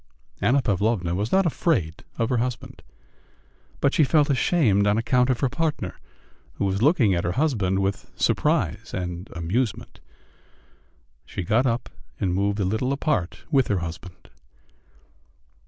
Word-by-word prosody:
Anna 135 +2 +3
Pavlovna 100 -3 0
was 105 +5 -2
not 195 0 +4
afraid 140 - 0
of 115 - 0
her 125 - +1
husband, 125 0 -4 1.0
but 140 - +2
she 155 - +4
felt 145 0 +3
ashamed 125 - +2
on 105 +1 +3
account 125 +2 +2
of 125 - 0
her 135 - +3
partner, 150 - -3 0.5
who - - -2
was 95 +1 -1
looking 130 - +4
at 85 - 0
her 90 - -1
husband 110 -11 +1
with 95 0 -2
surprise - - 0
and 90 +1 -5
amusement. 95 +6 -2 1.2
She 95 - -5
got 115 +9 +2
up 120 0 -1 0.3
and 95 -4 0
moved 100 +2 0
a 100 - +1
little 110 +7 0
apart 140 - -1
with 135 -5 +3
her 100 - +1
husband. 85 +1 -8
110 Hz, 145 wpm, -24 LUFS, 95-130 Hz, 1.2 s, not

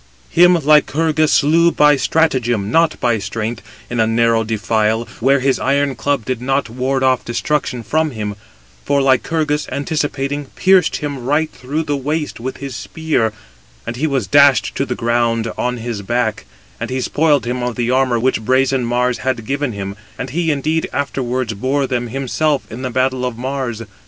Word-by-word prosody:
Him 180 +1 +6
Lycurgus 155 0 +3
slew 165 +4 +4
by 150 -2 +5
stratagem, 125 -9 +1
not 165 +3 +2
by 120 -3 +1
strength, 110 +3 -4 0.3
in 120 - -3
a 110 - +3
narrow 115 0 +2
defile, 110 +1 0
where 135 +3 +3
his 135 0 +1
iron 140 +1 +1
club 140 -2 -1
did 130 -2 -3
not 135 -2 -1
ward 130 +2 -1
off 130 -1 +2
destruction 125 0 -2
from 155 +8 0
him; 105 -5 -5 0.5
for 140 0 +1
Lycurgus, 150 +3 +1
anticipating, 145 -1 -2
pierced 185 -3 +3
him 145 -4 -4
right 150 +5 +1
through 145 +5 -3
the 145 -2 -1
waist 150 +2 -3
with 130 +3 -5
his 140 -3 -6
spear, 155 -9 -1 0.5
and 120 - -4
he 150 +6 -1
was 135 -3 0
dashed 140 -4 +4
to - - -2
the - - -2
ground 115 -1 0
on 125 0 -2
his 115 -2 -4
back; 110 +1 -1 0.3
and - - -4
he 130 0 -2
spoiled 145 +1 +2
him 125 +1 -2
of 120 -1 -2
the 120 0 -1
armour 130 -2 +2
which 125 0 0
brazen 130 +2 +2
Mars 125 +1 0
had 130 -3 -2
given 140 +1 -1
him, 100 -2 -5 0.2
and 130 0 -5
he 165 +2 0
indeed 155 +2 0
afterwards 130 -4 -2
bore 135 +7 0
them 125 -2 -2
himself 135 +3 -1
in 115 +4 -7
the 130 - -2
battle 130 +1 0
of 125 -2 -3
Mars. 130 -3 -3
130 Hz, 175 wpm, -18 LUFS, 120-145 Hz, 0.5 s, Him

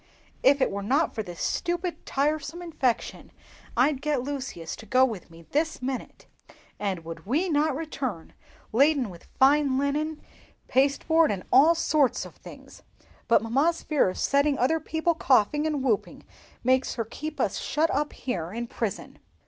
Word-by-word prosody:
"If 275 +1 +4
it - - +2
were 200 +1 -3
not 275 +10 +1
for 220 - -2
this 175 -4 -9
stupid, 350 0 -2
tiresome 300 +4 -1
infection, 280 -8 -2 0.5
I'd 270 +2 +3
get 295 -4 0
Lucius 260 - -5
to 220 - -12
go 255 +4 +5
with 220 -10 -6
me 165 0 -14
this 320 +2 0
minute, 255 -1 -5 0.5
and 190 -5 -3
would 165 +1 -8
we 320 - +1
not 300 -2 +2
return 265 - -5 0.4
laden 275 -2 +3
with 170 - -14
linen, 285 +2 +2 0.5
pasteboard, 285 +5 +3
and 195 -3 -2
all 300 +6 +7
sorts 305 -5 +1
of - - -11
things! - - -13 0.5
But 230 - +4
mamma's 280 +9 +1
fear 295 -10 +2
of 185 - -6
setting 280 +1 +2
other 275 +7 +2
people 320 +2 0
coughing 295 0 +2
and 295 -4 -1
whooping 230 -6 -1 0.4
makes 255 +1 +2
her 230 -3 -2
keep 305 +7 -7
us - - 0
shut 320 +2 0
up 295 +2 -1
here 175 -10 -4
in 235 +3 -4
prison." 225 -3 -5
275 Hz, 155 wpm, -26 LUFS, 230-305 Hz, 0.5 s, all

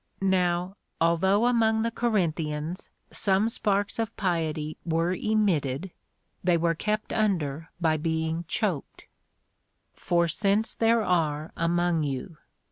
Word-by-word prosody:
Now, 180 0 +1 0.2
although 190 +6 +3
among 225 -2 +3
the 230 - 0
Corinthians 170 -7 -1 0.2
some 200 +2 +2
sparks 205 -1 -1
of 225 0 -3
piety 160 -5 -1
were 165 +1 0
emitted, 185 -7 0 0.5
they 175 -1 +3
were 165 0 +1
kept 215 +6 -2
under 165 -8 0
by 160 -2 +2
being 160 +1 -2
choked.^ 185 -9 -2 0.9
For 170 -1 +1
since 200 +6 +1
there 230 0 +2
are 155 -5 0
among 170 0 +1
you. 145 +3 -4
175 Hz, 115 wpm, -27 LUFS, 160-205 Hz, 0.9 s, although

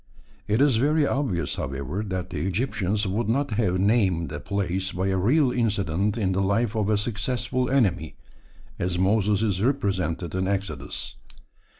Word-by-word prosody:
It 110 +5 +2
is 140 -5 +4
very 150 +5 +3
obvious, 130 - -1
however, 70 +8 -3
that 95 -1 -4
the 80 +1 -2
Egyptians 105 0 0
would 105 +3 -1
not 135 +3 0
have 105 -4 +1
named 95 - +2
a 75 - -4
place 95 0 -2
by 95 +2 -1
a 95 - +1
real 130 - +3
incident 105 -3 0
in 100 -4 +1
the 95 +1 0
life 100 +3 +1
of 105 -2 0
a 105 - +3
successful 120 +3 -1
enemy, 100 - +1 0.6
as 90 0 -1
Moses 100 +2 +2
is 100 -4 0
represented 95 - 0
in 95 0 -1
Exodus. 95 -8 -4
100 Hz, 160 wpm, -25 LUFS, 95-115 Hz, 0.6 s, is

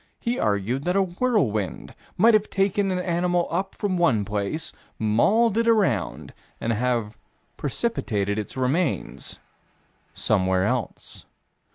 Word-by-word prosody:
He 240 +1 -2
argued 105 +6 0
that 180 +1 +1
a 195 - +4
whirlwind 175 - -1 0.2
might 225 +5 +6
have 215 -1 +3
taken 195 0 +1
an 185 - 0
animal 175 0 0
up 190 +3 -2
from 185 -3 -1
one 120 -12 +3
place, 105 +9 -2 0.2
mauled 200 - +3
it 230 - +1
around, 190 - +1 0.3
and 115 - 0
have 115 -2 -1 0.4
precipitated 110 - -1
its 105 - -6
remains 135 +5 -1 0.8
somewhere 95 -2 +2
else. 125 +1 -3
160 Hz, 125 wpm, -24 LUFS, -, 0.8 s, might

